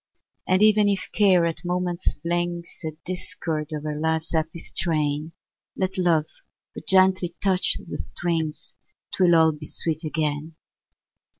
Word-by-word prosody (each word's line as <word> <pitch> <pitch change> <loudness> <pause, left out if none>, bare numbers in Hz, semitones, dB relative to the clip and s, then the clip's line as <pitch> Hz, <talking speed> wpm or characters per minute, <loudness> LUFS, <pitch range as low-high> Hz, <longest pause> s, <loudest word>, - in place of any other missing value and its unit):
And 185 +2 +4
even 210 -1 +5
if 200 -1 -1
Care 190 -5 +4
at 165 +2 -3
moments 180 0 -1
flings 170 +2 -3
A 160 -1 -3
discord 165 -4 -4
o'er 150 0 -4
life's 160 +1 0
happy 160 +1 -1
strain, 155 -2 -1 0.5
Let 190 0 -1
Love 170 -5 +2 0.5
but - - -10
gently 185 -2 +3
touch 190 -2 +2
the - - -8
strings, 165 -3 -3 0.4
'Twill 175 -2 +4
all 160 -1 +5
be 150 0 -8
sweet 160 0 -1
again! 155 0 -2
170 Hz, 130 wpm, -24 LUFS, 155-185 Hz, 0.5 s, even